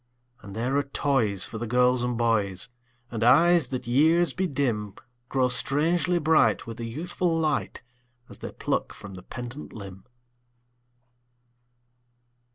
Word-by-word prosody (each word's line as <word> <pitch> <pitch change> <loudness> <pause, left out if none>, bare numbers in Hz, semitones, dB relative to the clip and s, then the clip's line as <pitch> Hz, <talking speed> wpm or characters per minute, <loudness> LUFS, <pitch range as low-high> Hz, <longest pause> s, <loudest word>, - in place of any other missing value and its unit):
And 100 -1 -10
there 120 +5 -1
are - - +3
toys 135 -8 +1
for 110 - -6
the 120 - -4
girls 125 +1 +3
and 125 -1 -1
boys; 110 -3 0 0.4
And 115 -1 -2
eyes 160 +5 +5
that 130 -1 -5
years 160 +8 +3
bedim 130 - -2 0.3
Grow 130 -2 +2
strangely 165 +7 +1
bright, 160 -1 +3
with 115 -1 -8
a 115 - -4
youthful 165 +7 -2
light, 155 -5 -1 0.4
As - - -10
they - - -7
pluck - - -2
from 100 -1 -11
the 90 - -9
pendant 120 +8 -8
limb. 95 -3 -10
125 Hz, 135 wpm, -26 LUFS, 115-155 Hz, 0.4 s, eyes